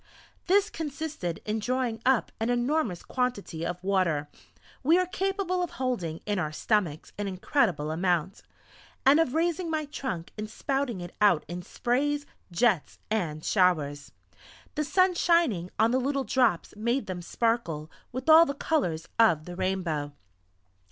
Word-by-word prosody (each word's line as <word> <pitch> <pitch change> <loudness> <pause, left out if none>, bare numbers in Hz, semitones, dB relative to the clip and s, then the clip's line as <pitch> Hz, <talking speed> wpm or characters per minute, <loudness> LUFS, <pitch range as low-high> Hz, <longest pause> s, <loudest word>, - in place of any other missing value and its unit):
This 405 +3 +3
consisted 295 - -4
in 215 +1 -1
drawing 245 -1 -1
up 265 -4 +3
an 225 +2 0
enormous 245 - 0
quantity 245 -10 -2
of 175 +1 -4
water 175 -7 +1 0.5
(we 320 +6 +4
are 365 - +3
capable 380 0 -1
of 355 - -1
holding 205 -12 -2
in 205 -2 0
our 155 -4 -1
stomachs 170 -2 -1
an 205 - -1
incredible 185 - 0
amount), 175 +2 0 0.6
and 280 +4 +7
of 315 -4 +1
raising 335 +1 0
my 310 -1 -1
trunk 260 - -5
and 215 0 -4
spouting 270 -5 -2
it 175 0 -8
out 200 -7 +4
in 175 +1 -5
sprays, 285 +9 -1 0.3
jets, 185 -2 +1
and 160 -8 -1
showers. 155 -7 +1 0.6
The 305 - -1
sun 370 +4 +3
shining 335 - +2
on 225 +1 +4
the 255 - +2
little 275 +1 0
drops 245 -11 +1
made 235 +5 0
them 180 -2 -5
sparkle 175 -7 -1 0.2
with 255 +3 -5
all 320 +1 +8
the 280 - -3
colours 180 - -1
of 165 -9 +4
the 180 - -7
rainbow. 175 -6 -2
225 Hz, 150 wpm, -28 LUFS, 175-285 Hz, 0.6 s, all